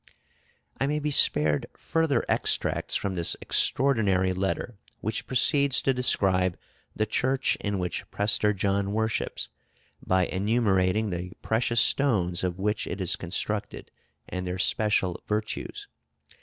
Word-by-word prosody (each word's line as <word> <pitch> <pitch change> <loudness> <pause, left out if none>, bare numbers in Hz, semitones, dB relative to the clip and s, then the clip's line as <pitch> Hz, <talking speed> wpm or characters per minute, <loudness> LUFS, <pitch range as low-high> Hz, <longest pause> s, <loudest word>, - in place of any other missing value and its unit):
I 135 - +1
may 150 +1 0
be 150 0 -2
spared 75 - +4
further 160 -7 0
extracts - - 0
from 100 - -1
this 85 -2 -2
extraordinary 100 -9 +2
letter, 95 +3 -3 0.2
which 110 +1 -4
proceeds 140 +1 +3
to 135 - +2
describe 95 -7 +2 0.4
the 110 - 0
church 130 +5 0
in 105 -1 -3
which 90 -1 -4
Prester 105 0 +2
John 100 0 -1
worships, 110 0 -2 0.5
by 95 -1 +2
enumerating 100 0 +1
the 90 +1 -5
precious 115 0 +1
stones 95 -13 +1
of 90 -1 -2
which 105 +2 -1
it 90 - -5
is 90 -3 +2
constructed, 100 +4 -3 0.4
and 90 0 -5
their 90 +1 -3
special 95 -1 +1
virtues. 105 0 -4
105 Hz, 130 wpm, -26 LUFS, 95-115 Hz, 0.5 s, spared